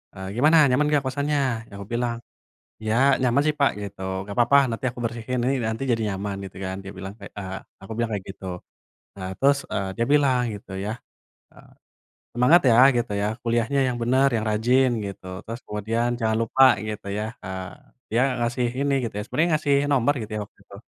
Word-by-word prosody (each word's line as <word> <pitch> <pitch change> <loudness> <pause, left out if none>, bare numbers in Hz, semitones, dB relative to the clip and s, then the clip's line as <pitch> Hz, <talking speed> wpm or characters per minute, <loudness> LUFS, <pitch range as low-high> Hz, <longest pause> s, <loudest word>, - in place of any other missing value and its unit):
eee, 95 -1 -7
"Gimana 155 +6 +5
nyaman 140 +4 +3
nggak 145 -2 +2
kosannya?" 145 +2 0 0.3
Ya - - -25
aku 100 - -7
bilang, 120 0 -1 0.7
"Ya 110 - +1 0.3
nyaman 125 +2 +3
sih 155 - +4
Pak," 140 - +4
gitu 100 -1 -8 0.2
"nggak 100 +2 -8
papa 120 +4 +5
nanti 115 +4 -4
aku 125 - -10
bersihkan 120 +1 -2
ini 135 +2 +2
nanti 110 +4 -3
jadi 115 -1 +1
nyaman," 100 +1 -4
gitu 90 - -17
kan. 95 0 -3
Dia 95 - -8
bilang 95 +1 -7
kayak, 100 - -10
eee, 95 -1 -5 0.3
aku 95 - -10
bilang 115 -1 0
kayak 95 - -5
gitu. 95 - -13 0.7
Nah, 95 - -5
terus, 140 +1 +4 0.2
eee, 100 -1 -1
dia 115 - +2
bilang 135 -4 +4
gitu 100 - -12
ya, 105 - -2 0.6
eee, - - -18 0.6
"Semangat 125 +9 +5
ya," 115 - +5 0.2
gitu 120 - -1
ya, 105 - +1 0.2
"kuliahnya 120 +4 +1
yang 125 -1 -2
bener, 130 +3 +3
yang 110 -1 0
rajin," 125 +5 +3 0.2
gitu. 100 -1 -8 0.2
Terus 115 +1 -6
kemudian 110 +3 -2
jangan 110 -1 +1
lupa 115 +4 +3 0.2
gitu 110 -1 -6
ya, 110 +2 -4
eee, 95 0 -5 0.4
dia 115 - +2 0.2
ngasih 120 +1 0 0.2
ini 140 0 +1
gitu 115 - -5
ya. 105 - -2
Sebenernya 165 +10 0
ngasih 145 -2 +2 0.2
nomor 135 +2 +3
gitu 110 0 -7
ya, 105 - -2
waktu - - -19
itu. - - -13
115 Hz, 200 wpm, -24 LUFS, 105-130 Hz, 0.7 s, Gimana